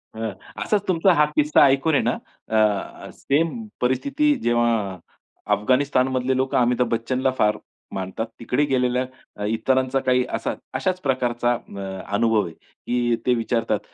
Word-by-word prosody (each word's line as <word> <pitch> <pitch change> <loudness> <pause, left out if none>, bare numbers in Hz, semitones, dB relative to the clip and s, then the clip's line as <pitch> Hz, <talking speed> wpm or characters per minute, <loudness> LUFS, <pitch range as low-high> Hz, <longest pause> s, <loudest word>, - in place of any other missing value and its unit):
अ, 110 -1 -3 0.3
असाच 205 -1 0
तुमचा 185 0 +4
हा 150 -2 +4
किस्सा 150 0 +4
ऐकून 140 +3 +2
आहे - - +3
ना, - - +2 0.4
अ, 110 -2 0
सेम 165 - -1
परिस्थिती 280 - +2
जेव्हा 115 -5 +1 0.6
अफगाणिस्तान 130 +5 +2
मधले 130 0 0
लोकं 130 0 0
अमिताभ 125 0 +2
बच्चनला 130 +3 0
फार 105 0 +2 0.4
मानतात. 95 +4 -3
तिकडे 125 +5 +1
गेलेल्या 125 -2 +1 0.3
अ, 105 - -3
इतरांचा 130 +5 +1
काही 130 -1 +2
असा - - -3 0.2
अशाच 185 -1 -1
प्रकारचा 120 -3 +1
अ, 95 -4 -6
अनुभव 115 -1 +2
आहे 85 - -8
की 120 +6 -2
ते 125 - +4
विचारतात, 115 0 0
125 Hz, 140 wpm, -23 LUFS, 115-135 Hz, 0.6 s, तुमचा